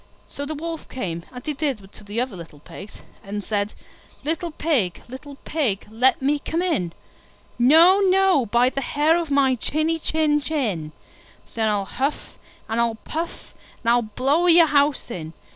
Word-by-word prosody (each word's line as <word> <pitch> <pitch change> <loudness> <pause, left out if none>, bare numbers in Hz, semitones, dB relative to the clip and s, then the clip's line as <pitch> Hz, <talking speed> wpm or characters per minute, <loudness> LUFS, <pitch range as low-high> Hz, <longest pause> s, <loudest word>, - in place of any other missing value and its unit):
So 285 0 -6
the 310 - -4
Wolf 325 +2 -6
came, 170 -9 -5
as 250 -1 -9
he 300 - -1
did 270 -10 -3
to - - -13
the 205 +3 -4
other 250 -4 -2
little 165 -4 -11
Pigs, 195 +7 -11 0.3
and 205 +1 -5
said, 205 0 -2 0.5
"Little 325 +3 -2
Pig, 285 - -1
little 270 +3 -10
Pig, 255 -11 -1
let 255 +3 +2
me 290 +2 +2
come 330 +4 -2
in." 225 - -1 0.7
"No, 325 +10 +7
no, 380 - +3
by 240 +4 +3
the 275 - -3
hair 295 +5 +2
of 340 -2 -2
my 275 -2 +3
chinny 310 +6 0
chin 305 -1 +1
chin." 215 - -2 0.6
"Then 220 -1 0
I'll 205 -2 0
huff 275 +8 -3 0.3
and 225 +1 0
I'll 230 -1 +1
puff, 325 +9 -6 0.3
and 230 - +3
I'll 240 0 +4
blow 270 +10 +1
your 340 -1 +7
house 285 -4 +1
in." 160 -5 -6
270 Hz, 170 wpm, -23 LUFS, 215-310 Hz, 0.7 s, No